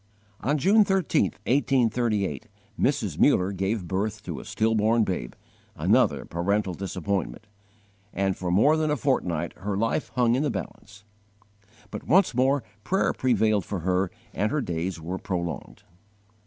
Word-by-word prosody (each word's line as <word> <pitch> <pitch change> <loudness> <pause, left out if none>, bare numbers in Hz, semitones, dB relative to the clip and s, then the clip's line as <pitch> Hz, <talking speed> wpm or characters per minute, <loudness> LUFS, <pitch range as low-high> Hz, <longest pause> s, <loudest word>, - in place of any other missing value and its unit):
On 145 +5 0
June 205 +9 +5
13, 190 - +2 0.2
1838, 120 - +1 0.3
Mrs. - - 0
Muller 90 +2 +4
gave 95 0 -2
birth 100 +3 -2
to - - -5
a - - -10
stillborn 110 +1 +2
babe, 90 - -3 0.4
another - - +2
parental 95 +3 -1
disappointment, 95 +3 -3 0.7
and 95 -1 0
for 90 - -4
more 110 - +4
than 155 -1 0
a 150 - +1
fortnight 90 - -1
her 100 +2 -3
life 115 +7 -1
hung 120 -2 +3
in 130 - +1
the 150 - +1
balance. 100 - -7 0.9
But - - -7
once 180 -2 +4
more 130 +2 +2 0.2
prayer 190 - +1
prevailed 110 -5 +2
for 95 +1 -4
her 90 +2 +1 0.2
and 105 - 0
her 150 - +1
days 85 -2 -3
were 90 +4 -5
prolonged. 85 -5 -5
105 Hz, 140 wpm, -26 LUFS, 95-130 Hz, 0.9 s, June